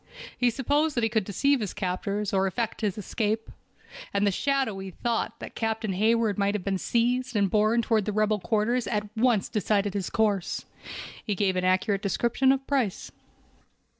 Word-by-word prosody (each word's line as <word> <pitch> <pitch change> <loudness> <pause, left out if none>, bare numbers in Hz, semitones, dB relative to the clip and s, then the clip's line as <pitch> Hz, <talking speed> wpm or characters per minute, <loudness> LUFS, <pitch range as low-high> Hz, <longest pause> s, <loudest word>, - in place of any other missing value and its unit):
He 245 - +3
supposed 290 +5 +1
that 240 - +1
he 225 - +2
could 220 -4 +1
deceive 275 +8 +2
his 210 -5 -4
captors, 200 +2 -2
or 195 0 +3
effect 225 +5 -3
his 210 -3 -1
escape. 215 +2 -2 0.6
And 200 0 +1
the 200 - +3
shadowy 220 -5 -1
thought 230 +5 -2
that - - -8
Captain 220 -2 -2
Hayward 220 +1 +2
might 200 +1 +1
have 200 - -3
been 195 -1 -1
seized 245 +3 0
and 200 -3 +2
borne 215 +2 +3
toward 220 -3 +1
the 210 - -1
rebel 215 0 +1
quarters 220 +6 0
at 210 0 -3
once 225 -3 +2
decided 205 -1 0
his 195 -3 -2
course. 205 -5 0 0.6
He 205 - -1
gave 190 -1 +1
an 185 0 0
accurate 190 +2 +2
description 235 +6 +2
of 270 0 0
Price. 255 -9 -1
215 Hz, 175 wpm, -27 LUFS, 200-235 Hz, 0.6 s, He